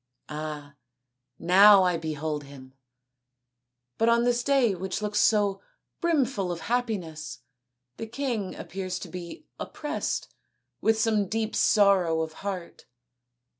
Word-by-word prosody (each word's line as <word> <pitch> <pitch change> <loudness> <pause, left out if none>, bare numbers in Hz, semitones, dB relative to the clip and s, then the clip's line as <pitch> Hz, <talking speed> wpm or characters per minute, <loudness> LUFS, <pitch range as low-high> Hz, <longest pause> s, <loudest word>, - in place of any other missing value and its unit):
Ah, 150 -2 -6 0.6
now 195 +3 +7
I 180 -1 +2
behold 155 -2 -3
him, 135 -2 -13 1.3
but 225 - +4
on 235 0 +4
this 245 0 +2
day 270 -6 +3
which 190 +1 -4
looks 210 0 -1
so 205 -3 +2 0.4
brimful 270 - +1
of 170 -1 -5
happiness 205 - -3 0.6
the 225 - -5
king 235 -5 -3
appears 185 -1 -5
to - - -8
be 180 - -8
oppressed 300 +1 -4 0.5
with 220 0 +2
some 215 -3 +2
deep 220 +2 -2
sorrow 190 -6 +4
of 160 -1 -4
heart. 190 -4 -6
195 Hz, 120 wpm, -27 LUFS, 165-225 Hz, 1.3 s, now